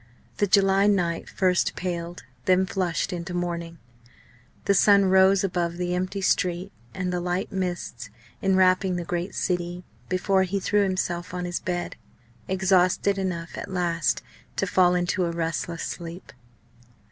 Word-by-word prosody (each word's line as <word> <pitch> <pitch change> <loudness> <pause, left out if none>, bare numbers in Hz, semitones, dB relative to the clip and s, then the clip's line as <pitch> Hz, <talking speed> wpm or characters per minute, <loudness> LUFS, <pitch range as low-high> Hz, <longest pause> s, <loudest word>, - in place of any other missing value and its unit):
The 205 - +2
July 195 +1 +4
night 175 -5 0
first 180 -2 +1
paled, 175 -3 -4 0.2
then 185 0 +4
flushed 185 -1 -1
into 175 +1 -5
morning; 170 -1 -3 0.9
the 200 - +4
sun 200 +1 +5
rose 190 +1 +5
above 175 -2 -1
the 180 0 -1
empty 185 +2 -2
street 180 0 0 0.2
and 185 -1 -2
the 180 - 0
light 180 +1 -2
mists 175 - -4 0.3
enwrapping 185 -1 +3
the 175 - -2
great 175 +2 -3
city, 175 -1 -2 0.3
before 190 +1 +2
he 190 +1 0
threw 205 +2 +2
himself 180 -2 -1
on 180 0 -3
his 175 0 -2
bed, 175 -1 -3 0.5
exhausted 190 +1 +2
enough 170 -3 -3
at - - -6
last 175 -2 0 0.3
to - - 0
fall 180 -1 +3
into 180 +1 0
a 170 - -1
restless 165 0 -3
sleep. 170 -1 -7
180 Hz, 145 wpm, -25 LUFS, 175-190 Hz, 0.9 s, sun